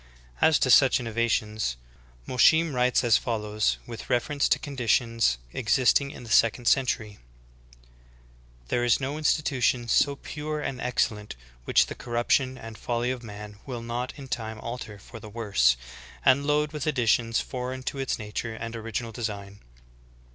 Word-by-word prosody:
3. - - +6
As 160 - +4
to 130 - +2
such 135 +1 +6
innovations, 110 - -1 0.5
Alosheim 160 +5 +4
writes 125 0 +2
as 115 -3 +5
follows, 105 -2 -1
with 115 -2 -9
reference 140 +4 +1
to - - +4
conditions 115 - +1 0.2
existing 130 +4 +2
in 140 - -10
the 115 - -9
second 115 +2 +3
century: 110 -6 +1 1.5
"There 120 - +1
is 120 -2 +3
no 140 +3 -3
institution 130 -6 +1
so 140 +4 +3
pure 150 +2 -5
and 130 -3 -4
excellent 105 -4 -1 0.3
which - - +4
the - - -6
corruption 125 +2 0
and 115 -1 -10
folly 120 +1 -1
of 130 -2 -5
man 105 -2 -9
will 120 -3 -5
not 120 +2 -3
in 140 -2 -9
time 110 -3 -4
alter 115 -3 -6
for 115 +3 -12
the 110 - -10
worse, 100 - +2 0.5
and 140 +2 +4
load 150 0 +2
with 150 -1 -4
additions 115 -4 +2
foreign 130 0 -5
to 135 - -4
its 135 - -1
nature 110 +2 -5
and 115 +1 -6
original 115 +1 -4
design. 100 -3 -5
120 Hz, 155 wpm, -26 LUFS, 110-130 Hz, 1.5 s, 3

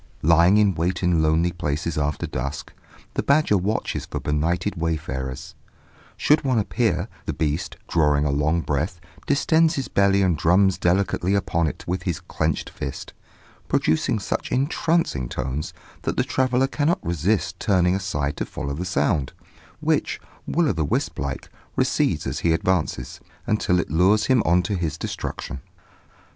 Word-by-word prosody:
Lying 85 +5 +5
in 105 -2 +4
wait 90 +3 -1
in 90 -2 +3
lonely 80 +3 +2
places 85 -1 -2
after 75 -1 -1
dusk, 70 +2 -5 0.4
the - - 0
badger 140 -6 +3
watches 100 +4 -1
for - - -4
benighted 85 +7 -1
wayfarers: 70 -6 -3 0.6
should 155 +1 +3
one 130 -3 +1
appear, 105 -3 0 0.2
the - - -1
beast, 75 0 -2
drawing 75 -3 +2
a 70 - +1
long 75 +4 +1
breath, 80 +4 -2 0.3
distends 160 +3 +3
his 135 - -2
belly 100 0 +3
and 90 -4 +2
drums 95 +4 +3
delicately 95 +1 +1
upon 85 -4 +1
it - - -5
with 90 +1 -2
his 90 -2 -2
clenched 80 -3 -2
fist, 70 - -6 0.5
producing 110 +10 +1
such 100 - -3
entrancing 135 - 0
tones, 65 +3 -3 0.3
that - - -2
the - - +3
traveller 130 0 +1
cannot 150 +5 0
resist 85 +5 0
turning 90 -3 +3
aside 75 -7 -2
to - - -1
follow 70 - -5
the 85 +6 -4
sound, 75 -5 0 0.5
which, - - 0 0.3
Will 170 -1 +2
o' - - +3
the 80 - -1
wisp 70 - -1
like, 70 -1 -4 0.3
recedes - - +1
as - - -2
he 85 - +2
advances, 80 -8 -1 0.3
until 90 -4 +1
it 80 - -3
lures 95 +6 +4
him 130 -3 +4
on 90 +2 +4
to 100 - -2
his 85 -5 -2
destruction. 70 -4 -5
85 Hz, 155 wpm, -23 LUFS, 75-100 Hz, 0.6 s, Lying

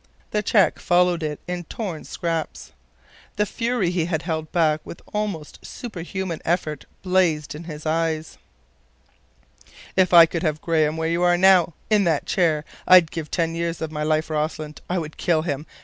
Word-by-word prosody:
The 210 - +1
check 210 -1 +3
followed 175 -1 +2
it 150 -2 -3
in 175 -1 -4
torn 185 -7 -5
scraps. 165 -2 -4 0.6
The 210 - +1
fury 230 -3 -1
he 175 -3 0
had 165 -2 -2
held 160 -2 -3
back 155 -3 +2
with - - -9
almost 205 -8 -4
superhuman 190 -5 -5
effort 160 -4 -1 0.2
blazed 180 -6 +1
in 155 +3 -9
his 155 -2 -8
eyes. 160 0 -1 1.6
"If 185 -1 +3
I 170 -2 +10
could 165 0 -4
have 155 -3 -1
Graham 155 -2 +1
where 160 0 -1
you 170 +1 0
are 175 0 +4
now—in 190 +2 +3
that 160 -4 +1
chair—I'd 165 +1 +3
give 160 -2 -5
ten 165 -2 0
years 170 0 -2
of 160 -1 -4
my 150 -1 -4
life, 155 +1 0
Rossland. 155 0 -3
I 180 - 0
would 155 -3 -5
kill 160 -3 +1
him. 150 -2 -3
165 Hz, 165 wpm, -23 LUFS, 155-180 Hz, 1.6 s, I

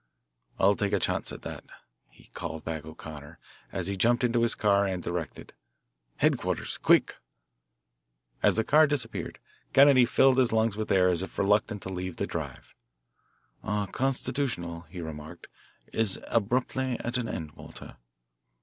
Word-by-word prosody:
"I'll 100 +2 +4
take 100 -1 -1
a - - +3
chance - - -1
at - - -9
that," - - -7 0.7
called 80 -1 -6
back 80 -2 -4
O'Connor 80 0 -10 0.3
as 95 - -3
he 100 +2 -1
jumped 120 +6 +2
into 120 -1 +2
his 115 - +2
car 100 -1 +3
and 90 -2 -3
directed, 85 -2 -5 0.6
"Headquarters, - - 0
quick." - - +3 1.2
As - - +4
the 110 - +2
car 155 +6 +5
disappeared, 145 -2 -3 0.4
Kennedy 135 -2 +7
filled 135 +1 +4
his 125 -2 +3
lungs 110 -1 +2
with 110 0 -3
air 90 -1 +5
as 90 -1 +1
if 95 - -7
reluctant 105 0 +1
to - - -5
leave 90 -1 -4
the - - -1
drive. - - -6 0.9
"Our 105 0 -1
constitutional," 115 - -2
he 90 0 -7
remarked, 80 +1 -8 0.5
"is 110 -4 +2
abruptly 125 +3 0
at 120 +2 -2
an 120 -3 -3
end, 80 -2 -5
Walter." - - -11
100 Hz, 150 wpm, -28 LUFS, 85-120 Hz, 1.2 s, Kennedy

